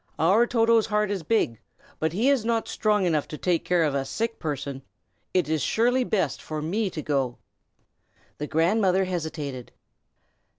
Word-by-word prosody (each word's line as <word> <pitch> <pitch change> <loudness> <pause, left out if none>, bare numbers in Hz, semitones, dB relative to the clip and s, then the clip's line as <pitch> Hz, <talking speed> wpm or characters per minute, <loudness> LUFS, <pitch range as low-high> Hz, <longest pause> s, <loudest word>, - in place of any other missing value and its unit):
Our 200 +9 +4
Toto's 230 -2 +3
heart 210 -1 +1
is 195 -3 -2
big, 155 - 0 0.4
but 160 0 0
he 215 +10 +1
is 270 -6 +2
not 230 0 0
strong 210 -3 +1
enough 155 -4 +1
to 150 - -7
take 175 0 0
care 175 -2 +2
of 150 -3 +1
a 140 -1 0
sick 225 +11 -3
person. 140 -3 -4 0.5
It 180 -5 +1
is 155 -1 0
surely 245 - +2
best 185 - -1
for 155 -1 -5
me 195 +7 -1
to 155 -4 -6
go." 135 -4 -1 1.0
The 150 - -3
grandmother 185 +4 +2
hesitated. 155 -8 -4
180 Hz, 165 wpm, -25 LUFS, 150-220 Hz, 1.0 s, Our